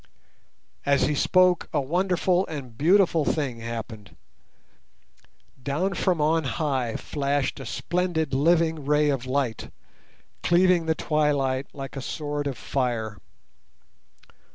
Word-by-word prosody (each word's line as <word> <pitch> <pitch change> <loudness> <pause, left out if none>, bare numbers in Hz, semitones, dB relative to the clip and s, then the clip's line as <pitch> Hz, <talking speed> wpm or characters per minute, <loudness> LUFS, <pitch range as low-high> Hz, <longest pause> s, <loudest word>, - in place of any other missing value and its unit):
As 140 -1 +2
he 150 - +1
spoke 180 +4 +3
a - - +1
wonderful 180 +4 +1
and 155 - -5
a 140 - -5
beautiful 165 - +3
thing 140 -5 -1
happened. 115 -2 -7 1.5
Down 155 +9 -1
from 180 -1 0
on 160 +2 +2
high 130 -2 -1
flashed 140 -2 -2
a - - -7
splendid 175 -5 -1
living 160 +2 +2
ray 150 +1 +2
of 130 -2 -3
light, 130 -4 -2 0.7
cleaving 175 -1 +3
the 160 - +2
twilight 140 -4 0
like 135 -1 -8
a 135 - -4
sword 145 +1 -3
of 135 -4 -4
fire. 115 -6 -2
145 Hz, 120 wpm, -25 LUFS, 130-165 Hz, 1.5 s, spoke